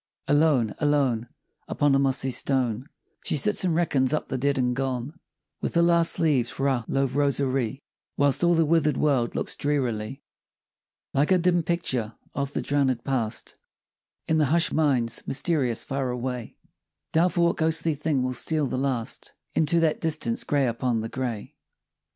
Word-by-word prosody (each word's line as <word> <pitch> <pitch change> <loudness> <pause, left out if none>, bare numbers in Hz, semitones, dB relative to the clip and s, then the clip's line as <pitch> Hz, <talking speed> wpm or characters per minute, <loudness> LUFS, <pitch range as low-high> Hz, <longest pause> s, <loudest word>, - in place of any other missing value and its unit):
Alone, 145 -6 +3
alone, 135 -6 +1 0.4
Upon 145 -1 +1
a 135 - +4
mossy 135 -1 +1
stone, 130 0 0 0.3
She - - 0
sits 210 +9 +1
and 175 -3 +1
reckons 145 -5 +1
up - - -4
the 130 - -2
dead 140 +2 +1
and 125 -1 +1
gone, 135 +4 -3 0.4
With - - -2
the 170 - +4
last 170 -1 +3
leaves 140 -7 +2
for 135 - -2
a 125 -4 0
love 135 -1 0
rosary; 135 -2 0 0.3
Whilst 140 +3 +2
all 175 0 +4
the 165 -1 +3
wither'd 155 -1 +2
world 135 -6 +1
looks - - -2
drearily, 135 -3 -2 0.9
Like 145 +5 +2
a 185 - +6
dim 175 0 +2
picture 130 -10 -2 0.2
of 140 0 -3
the - - -2
drownëd 135 -4 0
past 120 -5 -2 0.7
In 160 0 +2
the 150 - +4
hush'd 170 +4 +3
mind's 135 -7 +1
mysterious 135 -5 0
far 135 -1 -2
away, 125 -1 -4 0.6
Doubtful 175 +1 +2
what 170 - +1
ghostly 160 0 +1
thing 145 -2 -1
will 130 0 -1
steal 155 +4 0
the 130 0 -2
last 130 -4 -3 0.2
Into 160 +2 +2
that 160 -2 +1
distance, 155 -8 0
gray 145 -2 +1
upon 120 -1 -1
the 110 - -5
gray. 120 -5 -4
140 Hz, 160 wpm, -25 LUFS, 125-155 Hz, 0.9 s, a